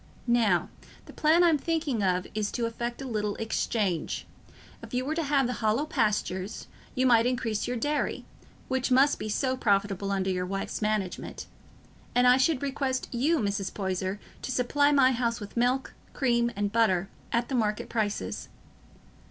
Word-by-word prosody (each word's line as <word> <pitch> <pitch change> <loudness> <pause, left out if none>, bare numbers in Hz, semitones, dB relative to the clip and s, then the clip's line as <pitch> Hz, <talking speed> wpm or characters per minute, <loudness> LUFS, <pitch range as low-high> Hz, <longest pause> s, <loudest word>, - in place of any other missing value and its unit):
Now, 230 -7 +2 0.4
the - - -12
plan 320 +3 +4
I'm 325 -4 +4
thinking 315 -7 -1
of 185 -1 +1
is 210 -1 -1
to 240 - -1
effect 235 +3 -4
a - - -5
little 210 -3 -1
exchange. 215 -5 -1 0.6
If - - -7
you 255 +1 0
were 300 - -1
to 330 - -1
have 280 -3 +2
the 250 - -1
Hollow 220 +7 +2
Pastures, 210 -6 -1 0.3
you 255 - +2
might 235 -2 +5
increase 230 -4 -1
your 245 0 -2
dairy, 290 +5 -1 0.4
which 260 0 0
must 265 +3 +4
be 215 - -4
so 260 +4 0
profitable 200 -3 +1
under 190 -1 0
your 180 0 -2
wife's 195 +3 -3
management; 210 -3 -2 0.7
and 245 0 +5
I 250 +1 +7
should 270 +1 +2
request 270 -2 -1
you, 280 +8 +2
Mrs. 200 -5 -1
Poyser, 190 0 -2 0.2
to - - -4
supply 285 +4 +2
my 270 -2 +5
house 235 -1 0
with 205 -2 -9
milk, 250 +3 +1 0.2
cream, 235 -3 +2
and 205 0 -1
butter 200 -5 +2 0.2
at 235 +1 +1
the - - -4
market 215 -4 0
prices. 215 -3 -2
235 Hz, 170 wpm, -28 LUFS, 205-260 Hz, 0.7 s, I